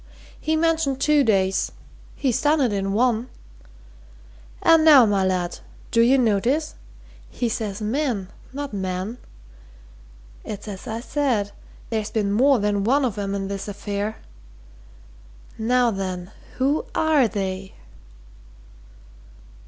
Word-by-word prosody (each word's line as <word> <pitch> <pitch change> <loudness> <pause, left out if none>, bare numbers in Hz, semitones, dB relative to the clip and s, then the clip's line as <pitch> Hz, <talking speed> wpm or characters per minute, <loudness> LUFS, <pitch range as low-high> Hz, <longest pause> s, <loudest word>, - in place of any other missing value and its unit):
"He 315 +1 0
mentioned 320 -4 +1
two 300 0 +4
days 195 -4 +1 0.4
he's 260 -5 0
done 300 +1 +3
it 250 -6 +2
in 195 0 -1
one! 240 +2 +1 1.3
And 325 -1 +6
now, 290 -6 +8
my 200 -2 +1
lad 180 -2 -1 0.3
do 230 - +4
you 250 +4 +5
notice? 250 +6 +1 0.6
he 245 - -2
says 215 -3 -3
men, 225 -5 -1 0.2
not 280 -2 -5
man! 190 +4 -3 1.2
It's 210 +1 -7
as 195 -2 -7
I 225 +1 -4
said 245 -7 0 0.4
there's 220 -2 -1
been 205 -3 -1
more 265 +6 +4
than 205 -2 0
one 265 +6 +3
of 230 -6 -2
'em 200 0 -2
in 195 -1 -3
this 195 0 -5
affair. 205 +1 -3 1.4
Now 245 +1 +2
then 185 -2 -4 0.2
who 275 +4 +1
are 310 -6 +3
they?" 190 -2 -4
220 Hz, 120 wpm, -23 LUFS, 200-270 Hz, 1.4 s, now